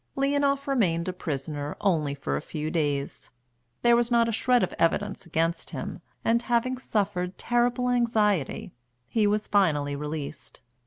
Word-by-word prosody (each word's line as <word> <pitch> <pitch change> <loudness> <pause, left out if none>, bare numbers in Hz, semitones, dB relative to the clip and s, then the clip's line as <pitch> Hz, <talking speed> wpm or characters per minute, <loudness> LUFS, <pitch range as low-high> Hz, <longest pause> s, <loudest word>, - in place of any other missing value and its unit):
Leonoff 280 0 +1
remained 185 -11 +1
a 185 - -1
prisoner 145 -3 -4
only 155 -8 +1
for 140 - -2
a - - -2
few 155 0 -4
days; 145 -4 -2 0.5
there 240 0 +6
was 240 0 +2
not 235 -1 +4
a - - 0
shred 245 +1 +3
of 185 - -1
evidence 195 +3 0
against 165 +1 -1
him, - - -6 0.2
and, 235 +1 +3
having 240 +1 +1
suffered 200 -7 -2
terrible 240 +1 +1
anxiety, 220 - +1 0.3
he 215 - +2
was 210 +1 0
finally 150 -8 +2
released. 150 0 -6
200 Hz, 150 wpm, -27 LUFS, 155-240 Hz, 0.5 s, there